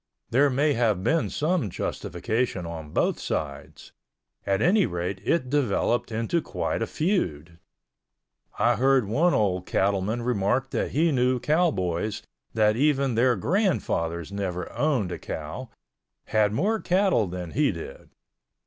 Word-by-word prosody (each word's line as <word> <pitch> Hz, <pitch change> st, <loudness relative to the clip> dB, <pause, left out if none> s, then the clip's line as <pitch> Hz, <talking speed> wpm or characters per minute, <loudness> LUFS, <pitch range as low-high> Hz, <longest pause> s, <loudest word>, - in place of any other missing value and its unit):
There 140 Hz, +5 st, +4 dB
may 145 Hz, +3 st, +2 dB
have 110 Hz, -6 st, +1 dB
been 160 Hz, +6 st, +1 dB
some 155 Hz, -, 0 dB
justification 95 Hz, +4 st, -2 dB
on 80 Hz, -2 st, -7 dB
both -, -, 0 dB
sides; 70 Hz, -2 st, -5 dB, 0.6 s
at 95 Hz, 0 st, +2 dB
any 180 Hz, -, +3 dB
rate 90 Hz, +2 st, -4 dB
it 160 Hz, 0 st, +1 dB
developed 120 Hz, -4 st, 0 dB
into 115 Hz, +10 st, 0 dB
quite -, -, -3 dB
a -, -, 0 dB
feud. 85 Hz, -, -2 dB, 1.0 s
I -, -, +3 dB
heard 135 Hz, -1 st, +3 dB
one 160 Hz, -, +2 dB
old 90 Hz, -4 st, 0 dB
cattleman 100 Hz, +4 st, 0 dB
remark 125 Hz, +3 st, 0 dB
that -, -, -1 dB
he 160 Hz, +3 st, +2 dB
knew 125 Hz, -1 st, +2 dB
cowboys 110 Hz, -, 0 dB, 0.3 s
that 105 Hz, -1 st, +3 dB
even 140 Hz, 0 st, +2 dB
their 120 Hz, +2 st, +3 dB
grandfathers 95 Hz, -, -1 dB
never 90 Hz, -3 st, -4 dB
owned 130 Hz, -, 0 dB
a -, -, -5 dB
cow, 80 Hz, +12 st, -6 dB, 0.6 s
had 105 Hz, -2 st, +2 dB
more 215 Hz, -, +1 dB
cattle 185 Hz, -, +2 dB
than 90 Hz, -2 st, -6 dB
he 145 Hz, +1 st, +2 dB
did. 85 Hz, -3 st, -9 dB
115 Hz, 135 wpm, -26 LUFS, 90-145 Hz, 1.0 s, There